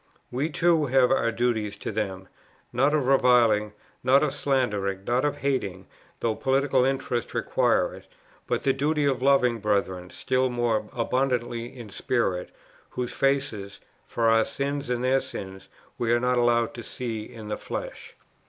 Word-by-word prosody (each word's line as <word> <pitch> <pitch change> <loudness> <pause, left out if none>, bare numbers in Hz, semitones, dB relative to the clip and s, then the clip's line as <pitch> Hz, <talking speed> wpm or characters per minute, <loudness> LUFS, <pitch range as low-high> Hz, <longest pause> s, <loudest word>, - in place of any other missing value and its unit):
We 135 +6 -1
too 165 -1 +2
have 130 -1 +4
our 115 -3 +2
duties 110 -3 -1
to - - -5
them; 95 -3 -3 0.5
not 140 +5 +3
of 145 -4 +1
reviling, 120 -5 +4 0.3
not 135 +3 +5
of 145 -3 0
slandering, 105 -10 -1
not 120 +4 +1
of 145 - +1
hating, 100 -9 -1 0.4
though 115 - +1
political 135 +1 +2
interests 130 -3 -1
require - - +1
it; - - -13 0.4
but - - -1
the 135 - +3
duty 150 +2 0
of 135 -3 +1
loving 125 -4 +3
brethren 95 -4 -1
still 130 +4 0
more 120 -3 0
abundantly 120 -1 -1
in 120 -4 -11
spirit, 95 -6 -1 0.4
whose 125 -1 -4
faces, 135 -8 -1 0.3
for 115 -1 -1
our 115 0 +5
sins 140 +2 -3
and 125 0 -1
their 130 +1 +3
sins, 95 0 -8 0.3
we 115 -1 +1
are 120 - +4
not 125 0 +1
allowed 120 -1 +2
to 120 - -8
see 115 -4 -5
in 110 -3 -9
the 105 - -1
flesh." - - -7
120 Hz, 160 wpm, -26 LUFS, 110-135 Hz, 0.5 s, not